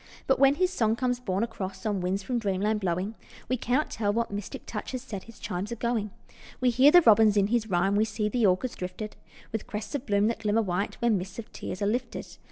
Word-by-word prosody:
But 265 - +2
when 275 +1 +6
his 365 +3 +1
song 225 -8 +2
comes 245 0 0
borne 195 -4 -1
across 195 -4 -5
On 205 -3 0
winds 190 +2 -1
from 245 +3 -1
dreamland 210 +1 0
blowing, 185 +2 -1 0.3
We 255 - +1
cannot 255 +5 0
tell 205 -2 0
what 230 +1 -1
mystic 205 -1 -6
touch 215 +4 -5
Has 255 -1 -4
set 205 -7 -7
his 230 -1 -14
chimes 185 +4 -4
a - - -2
going. 235 -2 -1 0.5
We 255 -1 +3
hear 260 +4 +6
the 350 +2 +7
robins 215 -3 +6
in 200 - +4
his 225 -1 0
rhyme, 195 +2 +2
We 210 - +4
see 210 0 -2
the 220 0 +2
orchards 190 +7 +1
drifted 185 +4 -6 0.4
With 220 -1 -4
crests 210 +6 -5
of 285 -2 -3
bloom 205 -1 +3
that 230 - -3
glimmer 220 +1 +1
white 190 +1 -2
When 225 -5 +3
mists 190 +1 -8
of 230 - -8
tears 185 - -5
are - - +2
lifted. 235 +3 -3
215 Hz, 235 wpm, -28 LUFS, 200-240 Hz, 0.5 s, the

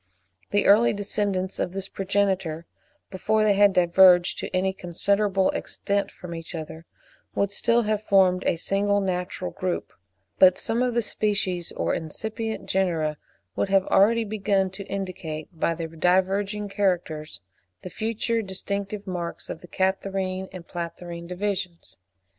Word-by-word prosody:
The 205 - +2
early 220 +4 +6
descendants 200 -2 -2
of 180 - -1
this 195 0 -4
progenitor, 190 -5 -1 0.5
before 215 +3 +1
they 210 -1 +4
had 200 0 +5
diverged 180 0 +5
to - - -4
any 190 +1 0
considerable 195 +2 +1
extent 200 0 -2
from 180 -1 -9
each 165 +1 -7
other, 160 +1 -7 0.5
would 200 0 +1
still 235 +3 +2
have 215 -1 0
formed 190 -3 +3
a - - +3
single 200 +4 +1
natural 180 -1 -2
group; 185 -1 -3 0.5
but 185 -1 +7
some 230 +2 -1
of 250 -2 0
the 235 - +2
species 195 -5 -1
or - - -1
incipient 220 +7 -4
genera 165 -5 0 0.4
would - - 0
have 195 -1 +3
already 230 +4 +4
begun 200 -3 0
to 195 +1 -7
indicate 175 -5 -5
by 165 0 0
their 165 0 -4
diverging 190 +5 +1
characters 175 -6 -1 0.4
the 185 - -7
future 230 +2 -1
distinctive 200 +1 -4
marks 175 -3 -5
of - - -7
the 175 - -12
Catarrhine 190 0 -1
and 185 -3 -9
Platyrrhine 170 0 -6
divisions. 180 - -4
190 Hz, 140 wpm, -25 LUFS, 180-205 Hz, 0.5 s, but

